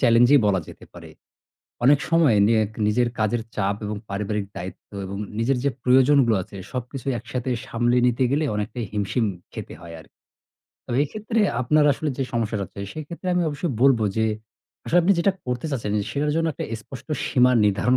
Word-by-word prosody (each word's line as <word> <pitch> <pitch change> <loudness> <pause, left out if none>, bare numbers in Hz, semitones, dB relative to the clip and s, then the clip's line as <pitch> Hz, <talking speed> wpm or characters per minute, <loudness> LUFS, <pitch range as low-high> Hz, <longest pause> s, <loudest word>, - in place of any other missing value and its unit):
challenge-ই 120 +3 +6
বলা 95 -3 +2
যেতে - - -12
পারে। 85 -2 -12 0.7
অনেক 140 +2 +6
সময় 165 -9 +4
নিয়েক 110 -2 +2 0.2
নিজের 120 +3 +2
কাজের 110 +2 +1
চাপ 100 -1 0
এবং 105 0 -3
পারিবারিক 105 +1 -2
দায়িত্ব 90 +1 -8 0.2
এবং 100 +1 -6 0.2
নিজের 125 +3 +1
যে 140 - +3
প্রয়োজনগুলো 130 -2 +5
আছে, 100 - -14 0.2
সবকিছুই 130 +1 -4
একসাথে 125 +3 -4 0.2
সামলে 120 +1 +1
নিতে 125 +2 +1
গেলে 150 +2 +1
অনেকটাই 105 +2 -3
হিমশিম 105 +3 0 0.3
খেতে - - -7
হয় 85 -1 -9
আর 80 - -14 0.8
তবে 120 - -2
এক্ষেত্রে 215 - -2 0.2
আপনার 150 +4 +3
আসলে 150 +3 -3
যে - - +1
সমস্যাটা 110 -3 -1
হচ্ছে, 100 - -10
সেক্ষেত্রে 155 +4 -8
আমি 180 - +2
অবশ্যই 150 +1 -3
বলব 135 -4 +6 0.2
যে, 110 - +2 0.6
"আসলে 175 - +3
আপনি 195 +3 +4
যেটা 195 +3 +3
করতে 125 +5 -2
চাচ্ছেন, 115 -6 -2 0.2
সেটার 150 +1 0
জন্য 165 0 +1
একটা - - -5
স্পষ্ট 115 +4 -9 0.2
সীমা 125 0 +4
নির্ধারণ 105 +5 +2
125 Hz, 170 wpm, -23 LUFS, 105-140 Hz, 0.8 s, challenge-ই